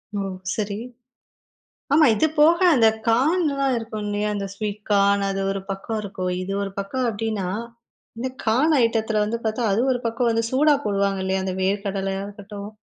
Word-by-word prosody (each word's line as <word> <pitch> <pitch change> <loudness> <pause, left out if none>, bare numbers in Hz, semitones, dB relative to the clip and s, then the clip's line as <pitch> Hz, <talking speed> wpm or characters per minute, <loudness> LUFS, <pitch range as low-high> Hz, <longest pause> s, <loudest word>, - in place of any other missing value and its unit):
ஓ! - - -1 0.4
சரி. 205 -2 -2 1.2
ஆமா 310 +1 +6
இது 220 +9 +2
போக 330 +3 +6 0.2
அந்த 230 -4 +5 0.2
கார்ன்லாம் 275 +2 +2
இருக்கும் 225 -2 -5
இல்லையா? 205 0 -1
அந்த 200 -1 -3
ஸ்வீட் 210 0 -4
கார்ன், 200 0 +4
அது 195 0 -2
ஒரு 195 0 -3
பக்கம் 195 +3 -3
இருக்கும். 190 -3 -4
இது 190 +2 -4
ஒரு 195 - -4
பக்கம் 245 +6 -2
அப்டின்னா, 215 -3 -2 0.7
இந்த 260 +2 -2 0.2
கார்ன் 265 +8 +3
ஐட்டத்துல 220 -2 +1
வந்து 230 +2 -2
பார்த்தா, 220 +1 0
அது 215 - +2
ஒரு 245 - -4
பக்கம் 235 +1 0
வந்து 230 0 +1
சூடா 290 +3 +4
போடுவாங்க 200 -1 0
இல்லையா? 190 0 0
அந்த 185 -1 -2
வேர்க்கடலையா 195 0 -1
இருக்கட்டும். 205 0 -9
210 Hz, 165 wpm, -23 LUFS, 200-235 Hz, 1.2 s, ஆமா